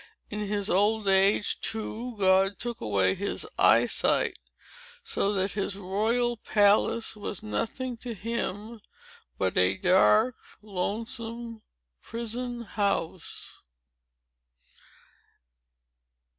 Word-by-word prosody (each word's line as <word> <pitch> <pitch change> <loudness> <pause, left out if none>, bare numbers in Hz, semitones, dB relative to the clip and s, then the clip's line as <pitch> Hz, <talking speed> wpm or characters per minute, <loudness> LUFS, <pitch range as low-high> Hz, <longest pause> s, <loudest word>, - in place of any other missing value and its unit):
In 210 - -4
his 205 -1 -1
old 210 +2 +2
age, 195 +2 +4
too, 225 +2 -3
God 190 0 +3
took 240 0 -4
away 100 -4 +2
his 200 +2 -4
eyesight; - - +3 0.6
so 205 - 0
that 195 0 0
his 200 -1 -2
royal 220 +5 0
palace 210 +2 +2
was 205 -2 -5
nothing 230 - -3
to 235 0 -6
him 220 0 -4 0.6
but 95 -1 -1
a 90 +1 +3
dark, 210 - +4 0.3
lonesome 230 +3 -4 0.4
prison 235 +1 -4
house." 200 -6 -3
210 Hz, 90 wpm, -27 LUFS, 195-230 Hz, 0.6 s, age